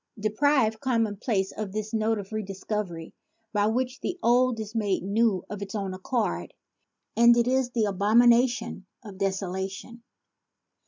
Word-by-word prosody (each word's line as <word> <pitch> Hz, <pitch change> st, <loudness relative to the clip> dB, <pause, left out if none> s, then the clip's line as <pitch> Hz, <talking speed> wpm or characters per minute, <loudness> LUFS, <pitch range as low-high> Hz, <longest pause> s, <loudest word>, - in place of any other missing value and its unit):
Deprive 220 Hz, +1 st, +2 dB
commonplace 220 Hz, -5 st, 0 dB
of 215 Hz, -3 st, -5 dB
this 215 Hz, +1 st, -4 dB
note 220 Hz, 0 st, +1 dB
of 200 Hz, -1 st, -7 dB
redis 200 Hz, -3 st, -6 dB
covery, 180 Hz, -7 st, -4 dB, 0.4 s
by 205 Hz, 0 st, +2 dB
which 250 Hz, +3 st, -1 dB
the 360 Hz, -, -3 dB
old 245 Hz, 0 st, +3 dB
is 215 Hz, 0 st, -6 dB
made 205 Hz, -5 st, 0 dB
new 200 Hz, -1 st, +1 dB
of 205 Hz, -1 st, -7 dB
its 200 Hz, +1 st, -6 dB
own 195 Hz, -3 st, -3 dB
accord, 185 Hz, -, -2 dB, 0.6 s
and 235 Hz, +1 st, +6 dB
it 235 Hz, 0 st, +2 dB
is 260 Hz, -1 st, +1 dB
the 235 Hz, -3 st, 0 dB
abomination 235 Hz, +2 st, +3 dB, 0.2 s
of 200 Hz, -4 st, -11 dB
deso 195 Hz, -1 st, -1 dB
lation. 190 Hz, +5 st, -6 dB
215 Hz, 150 wpm, -26 LUFS, 195-235 Hz, 0.6 s, and